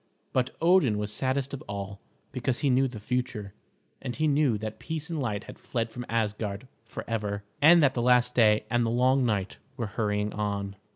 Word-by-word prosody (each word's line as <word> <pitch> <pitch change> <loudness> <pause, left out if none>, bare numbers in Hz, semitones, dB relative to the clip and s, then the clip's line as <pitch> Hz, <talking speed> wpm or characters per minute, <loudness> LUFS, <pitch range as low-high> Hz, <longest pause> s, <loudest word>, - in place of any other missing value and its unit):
But 130 0 +2
Odin 165 - +4
was 105 0 -2
saddest 135 +1 -1
of 140 - -5
all, 100 -1 -5 0.3
because 125 -1 -2
he 140 - +3
knew 130 +2 +3
the 120 -4 -8
future, 115 -3 -3 0.5
and 125 -3 -4
he 155 0 +1
knew 140 -6 +3
that 110 +1 -6
peace 160 0 -5
and 160 - -2
light 105 -5 -2
had - - -11
fled 115 -2 -3
from 120 +1 -7
Asgard 105 0 -2 0.2
forever, 105 -3 -4 0.2
and 165 +2 +7
that 135 -2 +4
the 120 - -1
last 125 0 +4
day 105 -3 +4
and 120 +1 +1
the 115 - 0
long 130 +3 +3
night 100 -3 -1 0.2
were 120 - -2
hurrying 105 0 -1
on. 100 -1 -2
120 Hz, 190 wpm, -28 LUFS, 105-130 Hz, 0.5 s, and